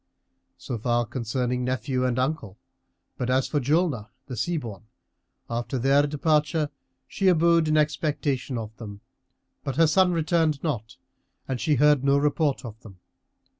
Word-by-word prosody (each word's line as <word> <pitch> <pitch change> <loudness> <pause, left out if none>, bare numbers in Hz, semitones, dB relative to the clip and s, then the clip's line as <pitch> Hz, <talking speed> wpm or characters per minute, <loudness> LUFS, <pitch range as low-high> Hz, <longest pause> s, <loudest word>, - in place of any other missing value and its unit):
So 120 - -5
far 120 +1 +1
concerning 125 +1 -2
nephew 130 0 -1
and 125 -1 -1
uncle, 130 -7 -2 0.6
but 125 -1 -1
as 130 +1 +2
for 150 - 0
Julnar 145 - +1 0.2
the 130 - -6
Sea 145 +10 -1
born, 110 -6 -7 0.6
after 120 +3 -3
their 135 +4 +3
departure 150 0 +1 0.4
she 195 - -1
abode 170 -2 +4
in 155 0 +2
expectation 150 -4 0
of 110 -1 -6
them, 105 -3 -9 0.6
but 135 - -3
her 165 +3 +5
son 180 +4 +4
returned 160 -3 +1
not 120 -9 -3 0.5
and 130 -2 -3
she 155 -3 +2
heard 145 0 +4
no 140 0 +4
report 145 -2 0
of 110 0 -9
him. 100 -6 -13
135 Hz, 150 wpm, -25 LUFS, 120-155 Hz, 0.6 s, her